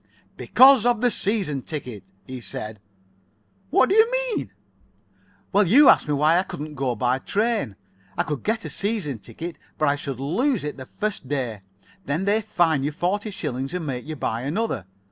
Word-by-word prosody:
"Because 260 -3 +6
of 240 -2 +2
the 245 +1 +2
season 195 -10 -1
ticket," 120 -10 -7
he 130 -1 -7
said. 110 -2 -4 0.9
"What 260 - +4
do - - +1
you 445 +3 +5 0.2
mean?" - - -3 1.0
"Well, 200 -1 +4
you 270 - +7
asked - - +5
me 150 - +1
why 155 +4 +4
I - - +3
couldn't 155 -5 -7
go 135 -4 -1
by 125 +3 +1
train. 215 - -1 0.4
I - - +2
could 150 -2 -4
get 220 +1 -1
a - - -4
season 195 - -2
ticket, 160 +11 -8 0.2
but 155 - +1
I 140 - +3
should 140 -3 -6
lose 195 - 0
it 150 0 -5
the 130 -1 -9
first 210 -10 -4
day. 125 -8 -2 0.5
Then 155 +7 -1
they 210 +2 +2
fine 175 -8 +1
you 145 - -1
forty 195 +7 -1
shillings, 135 -6 -4
and 175 -3 -3
make 125 -2 -4
you 155 - -4
buy 115 -5 -2
another. 150 - -2
155 Hz, 185 wpm, -24 LUFS, 135-210 Hz, 1.0 s, you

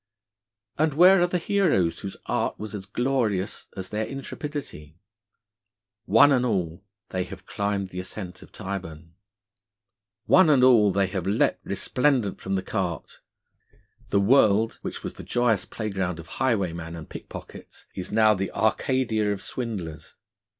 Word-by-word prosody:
And 155 -2 +2
where 180 +3 +7
are 175 - +4
the 180 - 0
heroes 170 - +1
whose 100 - -6
art - - -1
was 105 +1 -7
as 100 -2 -6
glorious 110 -4 -1
as 95 0 -5
their 110 +1 -2
intrepidity? 135 - -7 1.1
One 115 +8 +6
and 130 -3 +3
all 90 -7 -1 0.3
they 95 -1 -1
have - - -11
climbed 100 -1 -2
the 90 - -6
ascent 90 0 -7
of - - -15
Tyburn. 85 -5 -7 1.1
One 185 -4 +6
and 135 -4 +5
all, 115 -6 +6
they 100 +1 +2
have 95 -1 -4
leaped 100 +3 +1
resplendent 125 -7 0
from 95 0 -2
the 95 - -1
cart. 90 -7 -4 0.9
The 100 - +3
world, 110 0 +4
which - - -6
was - - -4
the - - -10
joyous 120 -6 +1
playground 95 -6 -3
of 80 - -9 0.2
highwaymen 85 -9 0
and 80 -2 -9
pickpockets, - - -10
is 90 - -6
now 110 0 +5
the 95 -1 -2
Arcadia 110 -2 +1
of 100 - -2
swindlers. 95 -11 -5
105 Hz, 145 wpm, -25 LUFS, 95-125 Hz, 1.1 s, where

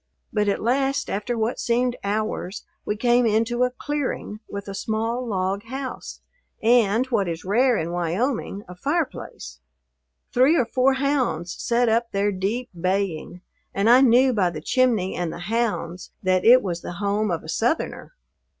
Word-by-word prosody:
But 210 -1 +1
at 200 - 0
last, 270 +4 0
after 210 +4 -2
what 225 +2 -1
seemed 245 +1 +1
hours, 205 -1 -3 0.2
we 210 - -1
came 240 +2 +3
into 225 +3 +1
a 250 - +4
"clearing" 255 -5 -4
with 200 0 -6
a 195 - -5
small 225 +4 -2
log 195 -1 -1
house 265 +2 -6 0.4
and, 230 0 +3
what 200 -5 +1
is 165 0 -5
rare 240 +5 +3
in 165 +1 -2
Wyoming, 195 - -2
a 180 - -9
fireplace. 275 - -3 0.7
Three 265 +7 +4
or 250 - +3
four 255 +3 +2
hounds 265 - 0
set 240 +1 +2
up 230 +1 +1
their 200 +1 +1
deep 205 +6 -2
baying, 180 -1 -2 0.3
and 200 +2 +1
I 245 +3 +7
knew 255 0 +5
by 190 -5 +2
the 165 -3 -6
chimney 220 0 +1
and 175 -2 -2
the - - -7
hounds 185 -3 -2
that 185 -1 +2
it 250 +3 +7
was 175 -3 -3
the - - -6
home 205 +3 -1
of 170 -2 -2
a - - -11
Southerner. 240 - -2
220 Hz, 165 wpm, -23 LUFS, 190-250 Hz, 0.7 s, I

